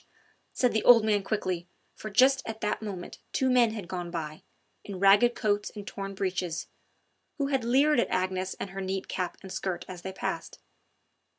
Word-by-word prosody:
said 250 Hz, -2 st, +1 dB
the 220 Hz, -, +1 dB
old 230 Hz, -3 st, +8 dB
man 210 Hz, -2 st, +2 dB
quickly, 185 Hz, -4 st, -2 dB, 0.3 s
for 215 Hz, -, -7 dB
just 260 Hz, +6 st, +5 dB
at 220 Hz, -1 st, -5 dB
that 210 Hz, -1 st, -1 dB
moment 195 Hz, -5 st, -6 dB
two 260 Hz, -1 st, +1 dB
men 245 Hz, -2 st, +5 dB
had 215 Hz, -5 st, -6 dB
gone 175 Hz, -1 st, -4 dB
by, 155 Hz, -3 st, -5 dB, 0.4 s
in 200 Hz, -2 st, -7 dB
ragged 205 Hz, +5 st, +6 dB
coats 205 Hz, -2 st, 0 dB
and 205 Hz, -1 st, -7 dB
torn 195 Hz, 0 st, -6 dB
breeches, 185 Hz, -3 st, -2 dB, 0.7 s
who 280 Hz, -2 st, 0 dB
had 270 Hz, -3 st, +1 dB
leered 275 Hz, +5 st, +4 dB
at -, -, +1 dB
Agnes 185 Hz, 0 st, -1 dB
and 195 Hz, -, -5 dB
her 195 Hz, 0 st, -5 dB
neat 190 Hz, 0 st, -3 dB
cap 180 Hz, -1 st, -3 dB
and 190 Hz, -, -9 dB
skirt 185 Hz, -3 st, -3 dB
as 180 Hz, -2 st, -8 dB
they 190 Hz, -, -5 dB
passed. 190 Hz, -, -4 dB
200 Hz, 185 wpm, -28 LUFS, 185-230 Hz, 0.7 s, old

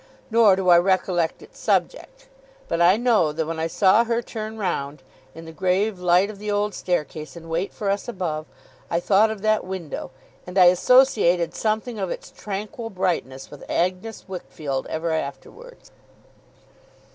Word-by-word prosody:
Nor 220 Hz, -4 st, +6 dB
do 190 Hz, -1 st, -3 dB
I 175 Hz, -1 st, +8 dB
recollect 180 Hz, -2 st, 0 dB
its -, -, -17 dB
subject. -, -, -1 dB, 0.4 s
But 170 Hz, -, -1 dB
I 180 Hz, +4 st, +6 dB
know 225 Hz, -10 st, +2 dB
that 160 Hz, +1 st, -2 dB
when 165 Hz, +1 st, -4 dB
I 160 Hz, -, 0 dB
saw 195 Hz, +6 st, +4 dB
her 235 Hz, 0 st, -1 dB
turn 220 Hz, -1 st, -6 dB
round, 150 Hz, -8 st, -3 dB, 0.3 s
in 165 Hz, 0 st, -10 dB
the 160 Hz, -, -9 dB
grave 190 Hz, +4 st, 0 dB
light 180 Hz, +3 st, +3 dB
of 200 Hz, -, -13 dB
the 210 Hz, 0 st, -5 dB
old 205 Hz, 0 st, 0 dB
staircase, 155 Hz, -4 st, -3 dB
and 165 Hz, -1 st, -10 dB
wait 170 Hz, +4 st, -1 dB
for 205 Hz, -, -5 dB
us, 200 Hz, +1 st, -1 dB
above, 170 Hz, -8 st, -4 dB, 0.4 s
I 170 Hz, -, +1 dB
thought 205 Hz, +4 st, +3 dB
of 215 Hz, -2 st, -6 dB
that 215 Hz, 0 st, +2 dB
window; 180 Hz, -7 st, -6 dB, 0.4 s
and 180 Hz, +2 st, -6 dB
I 185 Hz, -, +8 dB
associated 185 Hz, -6 st, +3 dB
something 220 Hz, +1 st, -2 dB
of 190 Hz, -2 st, -2 dB
its -, -, -7 dB
tranquil 210 Hz, +3 st, -6 dB
brightness 170 Hz, -, -3 dB
with 145 Hz, -, -11 dB
Agnes 185 Hz, +6 st, -2 dB
Wickfield 155 Hz, -7 st, -5 dB
ever 160 Hz, +1 st, -2 dB
afterwards. 435 Hz, -, -7 dB
185 Hz, 165 wpm, -23 LUFS, 165-215 Hz, 0.4 s, I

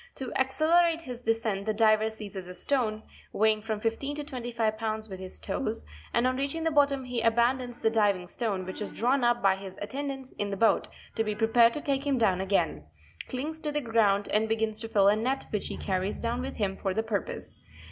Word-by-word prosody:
To 260 Hz, -2 st, -4 dB
accel 265 Hz, +5 st, +2 dB
erate 335 Hz, -1 st, +1 dB
his 250 Hz, -6 st, -7 dB
descent 225 Hz, -4 st, -1 dB
the 215 Hz, -, +1 dB
diver 215 Hz, 0 st, +4 dB
seizes 200 Hz, -4 st, -8 dB
a 180 Hz, -, -8 dB
stone 220 Hz, 0 st, 0 dB, 0.3 s
(weighing 215 Hz, 0 st, +3 dB
from 220 Hz, -1 st, -3 dB
15 230 Hz, +6 st, -2 dB
to 295 Hz, -, -4 dB
25 235 Hz, -6 st, -2 dB
pounds) 220 Hz, 0 st, -3 dB
with 190 Hz, -3 st, -8 dB
his 185 Hz, -, -6 dB
toes, 75 Hz, -1 st, -2 dB, 0.3 s
and 235 Hz, -, +2 dB
on 255 Hz, 0 st, +1 dB
reaching 280 Hz, +4 st, -2 dB
the 325 Hz, -, +1 dB
bottom 280 Hz, -2 st, +3 dB
he 250 Hz, -2 st, -2 dB
aban 235 Hz, +3 st, +3 dB
dons 245 Hz, -1 st, -6 dB
the 225 Hz, -, +3 dB
diving 205 Hz, -5 st, +2 dB
stone 195 Hz, 0 st, -2 dB
(which 185 Hz, +3 st, -7 dB
is 210 Hz, -, -4 dB
drawn 255 Hz, +3 st, +1 dB
up 240 Hz, -1 st, +2 dB
by 195 Hz, -1 st, +5 dB, 0.3 s
attendants 270 Hz, +3 st, -5 dB
in 205 Hz, -, -1 dB
the 195 Hz, -, -3 dB
boat, 225 Hz, +3 st, +3 dB, 0.3 s
te -, -, -1 dB
be 215 Hz, -1 st, -1 dB
prepared 230 Hz, +2 st, +4 dB
to 300 Hz, -, -3 dB
take 280 Hz, -2 st, -1 dB
him 275 Hz, -2 st, +2 dB
down 190 Hz, -6 st, +2 dB
again), 130 Hz, -, 0 dB, 0.4 s
clings 300 Hz, +5 st, -4 dB
to 305 Hz, -2 st, -2 dB
the 295 Hz, -, 0 dB
ground, 215 Hz, -4 st, +2 dB
and 220 Hz, +1 st, +1 dB
begins 220 Hz, -1 st, 0 dB
te 225 Hz, -, -5 dB
fill 205 Hz, -3 st, +4 dB
a 205 Hz, -, +6 dB
net 255 Hz, +5 st, -1 dB
which 210 Hz, -, -2 dB
he -, -, -5 dB
carries 190 Hz, +1 st, -2 dB
down 235 Hz, +1 st, -1 dB
with 265 Hz, +1 st, -5 dB
him 195 Hz, -3 st, -1 dB
for 190 Hz, -2 st, -2 dB
the 220 Hz, -, +1 dB
purpose. 215 Hz, -4 st, -4 dB
225 Hz, 220 wpm, -28 LUFS, 210-255 Hz, 0.4 s, a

